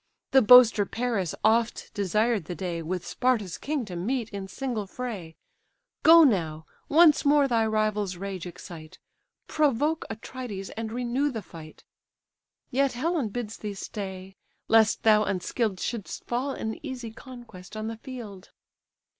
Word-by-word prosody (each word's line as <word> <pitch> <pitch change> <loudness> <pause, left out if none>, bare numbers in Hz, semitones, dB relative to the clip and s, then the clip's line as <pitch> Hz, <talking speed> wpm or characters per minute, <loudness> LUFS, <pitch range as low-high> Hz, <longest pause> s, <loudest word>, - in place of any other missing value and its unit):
The 265 - +6
boaster 235 -2 +8
Paris 225 -8 -2
oft 225 +1 +1
desired 210 0 0
the 175 - -5
day 175 -3 -4
With 180 +2 -4
Sparta's 215 -9 -1
king 290 -4 -2
to 185 -4 -8
meet 230 +6 -2
in 200 -2 -6
single 230 -1 -4
fray: 195 -9 -6 0.7
Go 330 +1 +8
now, 160 - +1 0.2
once 310 0 +6
more 290 -1 +4
thy 230 -3 +2
rival's 215 -3 0
rage 190 -1 -5
excite, 165 -2 -11 0.5
Provoke 300 +1 +1
Atrides, 220 -3 -7
and 220 0 -5
renew 250 +4 0
the 225 -6 -5
fight: 160 -3 -12 0.9
Yet 275 +1 +1
Helen 285 -1 -1
bids 220 0 -5
thee 210 -2 -6
stay, 190 -1 -7 0.3
lest 225 -1 +4
thou 215 -1 +5
unskill'd 200 +1 -2
Shouldst 225 -1 -4
fall 250 +4 -2
an 220 -3 -5
easy 255 -5 -6
conquest 225 -6 -12
on 215 - -4
the 225 0 -5
field." 220 -6 -9
220 Hz, 140 wpm, -27 LUFS, 195-250 Hz, 0.9 s, boaster